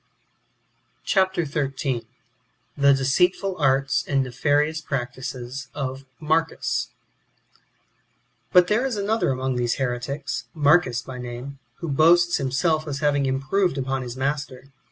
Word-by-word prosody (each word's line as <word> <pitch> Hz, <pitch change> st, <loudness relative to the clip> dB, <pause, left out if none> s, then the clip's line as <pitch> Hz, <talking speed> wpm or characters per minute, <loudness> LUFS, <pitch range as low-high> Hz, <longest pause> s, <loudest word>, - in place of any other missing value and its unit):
Chap. 190 Hz, -1 st, +2 dB
xiii. 140 Hz, -5 st, -2 dB, 0.4 s
— -, -, -44 dB
The 140 Hz, 0 st, +7 dB
deceitful 180 Hz, +8 st, +1 dB
arts 135 Hz, -2 st, +2 dB
and 135 Hz, -1 st, +2 dB
nefaonous 145 Hz, +5 st, +1 dB
j^ractices 130 Hz, 0 st, -5 dB
of 135 Hz, -1 st, -4 dB
Marcus, 160 Hz, +1 st, 0 dB, 1.6 s
1. 180 Hz, -1 st, +7 dB
But^ -, -, -14 dB
there 215 Hz, +5 st, +2 dB
is 255 Hz, -, -3 dB
another 210 Hz, 0 st, 0 dB
among 130 Hz, -1 st, -1 dB
these 120 Hz, -1 st, 0 dB
heretics, 135 Hz, +2 st, -3 dB
Marcus 145 Hz, -5 st, +3 dB
by 130 Hz, -1 st, -8 dB
name, 125 Hz, +3 st, -7 dB, 0.2 s
who 170 Hz, -, -3 dB
boasts 170 Hz, +4 st, +4 dB
of 135 Hz, -, -2 dB
himself 155 Hz, +4 st, 0 dB
as 140 Hz, 0 st, -4 dB
having 145 Hz, -2 st, +2 dB
improved 135 Hz, +6 st, 0 dB
upon 135 Hz, 0 st, -1 dB
his 125 Hz, 0 st, -6 dB
master. 135 Hz, -1 st, -3 dB
140 Hz, 130 wpm, -24 LUFS, 130-160 Hz, 1.6 s, The